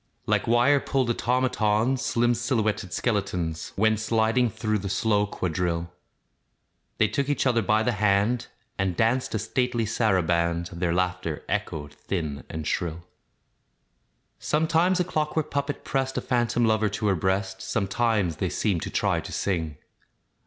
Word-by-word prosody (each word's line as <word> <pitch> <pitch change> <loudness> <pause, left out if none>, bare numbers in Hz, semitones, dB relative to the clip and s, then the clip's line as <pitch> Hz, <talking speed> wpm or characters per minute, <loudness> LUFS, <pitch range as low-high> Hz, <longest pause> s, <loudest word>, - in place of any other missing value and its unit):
Like - - +1
wire 120 +5 +4
pulled 130 -3 0
automatons, 125 0 +1
Slim 120 +1 +2
silhouetted 110 -5 -1
skeletons 90 -7 -2
Went 110 +1 +3
sidling 115 +2 +2
through 110 0 -1
the 100 0 -4
slow 105 +1 +1
quadrille. 85 -2 -2 1.0
They 110 - +4
took 140 +4 -1
each 145 - +1
other 120 -3 +3
by 110 +2 +2
the 125 - +1
hand, 105 +2 +1 0.3
And 95 -3 0
danced 115 +2 +1
a - - +2
stately 120 +2 0
saraband; 85 -6 +1
Their 85 0 -1
laughter 90 -3 -1
echoed 75 -2 -3
thin 75 -1 -4
and 80 -1 -5
shrill. 85 0 -2 1.4
Sometimes 165 +4 +2
a - - +3
clockwork 155 -2 -1
puppet 140 0 -2
pressed 135 -1 -1
A - - 0
phantom 120 -1 +1
lover 110 -1 +2
to 105 +2 -3
her 100 -2 +3
breast, 95 +2 -1
Sometimes 100 -4 0
they - - -1
seemed 95 -6 0
to - - -4
try - - +1
to - - -8
sing. 80 -7 -2
110 Hz, 145 wpm, -26 LUFS, 90-120 Hz, 1.4 s, wire